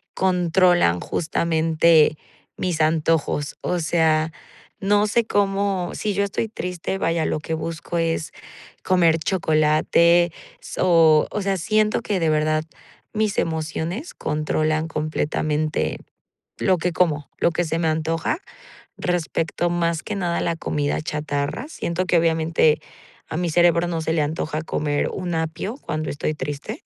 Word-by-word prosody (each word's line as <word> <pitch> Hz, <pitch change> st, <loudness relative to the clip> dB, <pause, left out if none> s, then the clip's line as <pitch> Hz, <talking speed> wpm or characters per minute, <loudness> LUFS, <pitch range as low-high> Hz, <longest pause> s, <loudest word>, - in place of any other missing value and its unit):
controlan 180 Hz, -, +3 dB
justamente 160 Hz, -1 st, +2 dB, 0.4 s
mis 175 Hz, -3 st, -1 dB
antojos. 155 Hz, -2 st, +1 dB
O 180 Hz, -, -1 dB
sea, 160 Hz, -1 st, +2 dB, 0.5 s
no 205 Hz, +2 st, +3 dB
sé 235 Hz, +3 st, +2 dB
cómo 195 Hz, -3 st, 0 dB
Si 210 Hz, -1 st, -2 dB
yo 200 Hz, +1 st, +1 dB
estoy 200 Hz, +3 st, -2 dB
triste, 180 Hz, -2 st, -4 dB
vaya, 165 Hz, -3 st, 0 dB
lo -, -, -1 dB
que 160 Hz, -, -5 dB
busco 165 Hz, +2 st, -4 dB
es 165 Hz, -1 st, -1 dB, 0.5 s
comer 170 Hz, -3 st, +3 dB
chocolate, 170 Hz, +1 st, +3 dB, 0.3 s
so 165 Hz, -4 st, +4 dB
O 210 Hz, -, -2 dB
sea, 195 Hz, 0 st, 0 dB
siento 215 Hz, +4 st, +1 dB
que 200 Hz, -3 st, -1 dB
de 165 Hz, -1 st, +1 dB
verdad 155 Hz, 0 st, +1 dB, 0.5 s
mis 215 Hz, -2 st, 0 dB
emociones 160 Hz, -, -3 dB
controlan 155 Hz, +1 st, -1 dB
completamente 155 Hz, 0 st, -1 dB, 0.6 s
lo 185 Hz, -2 st, +2 dB
que 175 Hz, +2 st, -1 dB
como, 155 Hz, -4 st, 0 dB
lo -, -, +3 dB
que 175 Hz, -, 0 dB
se 165 Hz, 0 st, -2 dB
me 165 Hz, -, 0 dB
antoja, 160 Hz, -, -1 dB, 0.6 s
respecto 175 Hz, -1 st, -1 dB
más 170 Hz, -1 st, 0 dB
que 210 Hz, -, -4 dB
nada 175 Hz, -3 st, -1 dB
a -, -, -2 dB
la 170 Hz, -, 0 dB
comida 145 Hz, -2 st, -1 dB
chatarra. 150 Hz, -, -3 dB
Siento 185 Hz, -, -2 dB
que 180 Hz, -, +3 dB
obviamente, 160 Hz, -2 st, +2 dB, 0.5 s
a 155 Hz, -, -3 dB
mi 175 Hz, 0 st, 0 dB
cerebro 170 Hz, +1 st, +3 dB
no 165 Hz, -2 st, -2 dB
se 160 Hz, -, -1 dB
le 160 Hz, -, +2 dB
antoja 155 Hz, +1 st, -2 dB
comer 145 Hz, -2 st, -1 dB
un 180 Hz, -2 st, -3 dB
apio 160 Hz, +8 st, -3 dB
cuando 155 Hz, -, -4 dB
estoy 145 Hz, +2 st, -2 dB
triste. 145 Hz, -1 st, -5 dB
165 Hz, 140 wpm, -22 LUFS, 155-180 Hz, 0.6 s, so